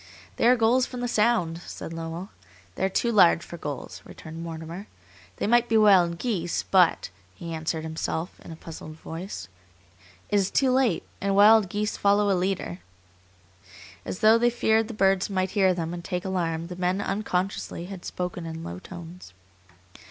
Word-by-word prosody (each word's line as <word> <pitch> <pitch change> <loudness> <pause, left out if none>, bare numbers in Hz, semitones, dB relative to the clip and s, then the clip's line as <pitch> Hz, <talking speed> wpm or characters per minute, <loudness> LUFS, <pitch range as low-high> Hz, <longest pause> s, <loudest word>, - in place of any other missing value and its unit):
"They - - +3
are 250 - +7
gulls 245 +2 +3
from 250 -1 -7
the 245 - -1
Sound," 210 -8 +1
said 165 - -7
Lowell. 165 +3 -6 0.4
"They - - -4
are 190 - +2
too 235 +5 0
large 175 -5 +5
for 170 - -9
gulls," 125 -10 -6
returned 160 +7 -10
Mortimer. 165 +4 -7 0.5
"They - - -2
might 240 +2 +3
be 225 - +4
wild 185 -5 +5
geese, 175 -5 -2
but," 180 - +3 0.2
he 170 -1 -7
answered 160 0 -3
himself, 160 +2 -4
in - - -10
a - - -7
puzzled 160 -1 -10
voice, 160 - -7 0.8
"it 205 - +4
is 195 -1 +2
too 265 -2 +2
late; 255 -8 +2 0.2
and 195 0 0
wild 210 -1 +6
geese 210 +2 -2
follow 205 0 +3
a - - +4
leader." 180 - -2 1.2
As - - -6
though 220 +1 +6
they 240 +1 +4
feared 225 -2 +2
the 230 - -7
birds 195 -1 +2
might 190 -1 -1
hear 195 -3 +3
them 170 -2 -3
and 175 -1 -6
take 180 0 -4
alarm, 170 -3 -1
the 180 +1 -7
men, 180 +2 0
unconsciously, 195 -3 -2
had 190 -1 -9
spoken 180 -1 -4
in 165 0 -6
low 85 +1 -6
tones. 175 - -11
185 Hz, 175 wpm, -26 LUFS, 165-210 Hz, 1.2 s, are